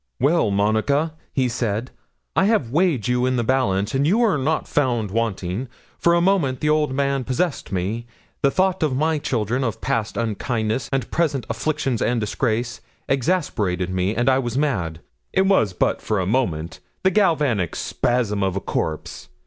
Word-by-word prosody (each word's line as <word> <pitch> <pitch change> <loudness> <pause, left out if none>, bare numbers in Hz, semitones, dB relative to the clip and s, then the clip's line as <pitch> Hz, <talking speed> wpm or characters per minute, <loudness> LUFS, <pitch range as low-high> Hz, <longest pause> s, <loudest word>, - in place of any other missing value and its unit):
'"Well, 145 -1 +3
Monica," 110 +10 +1 0.2
he 130 -2 +1
said, 115 0 -2 0.4
"I 190 - +4
have 200 - +1
weighed 155 - +2
you 125 0 +2
in 130 - +1
the 120 - +1
balance, 110 -5 +1
and 135 +2 +2
you 210 +8 +3
are 215 -7 +3
not 155 +4 0
found 120 -8 0
wanting. 110 0 -2 0.3
For 170 0 +4
a 170 - +3
moment 170 -9 +2
the 150 - 0
old 150 -2 +2
man 140 0 0
possessed 135 +5 -2
me: 100 +6 -2 0.3
the 140 - +4
thought 185 +4 +1
of 150 -5 +1
my 155 +1 +1
children, 120 -1 -1
of 115 -5 -2
past 110 -2 -2
unkindness, 115 +1 -1
and 135 -2 -1
present 150 -6 0
affliction 145 -6 -1
and 120 0 +1
disgrace, 115 +2 -1 0.3
exasperated 110 - 0
me, 95 +3 0
and 120 +1 0
I 130 0 +4
was 120 -1 -2
mad. 90 - -1 0.3
It 190 - +3
was 190 - +3
but 90 - 0
for 105 - -1
a 95 - 0
moment 85 -8 -1 0.2
the 190 - +4
galvanic 150 - +2
spasm 120 -5 0
of 95 -1 0
a - - 0
corpse. 80 -8 -4
125 Hz, 175 wpm, -22 LUFS, 105-150 Hz, 0.4 s, I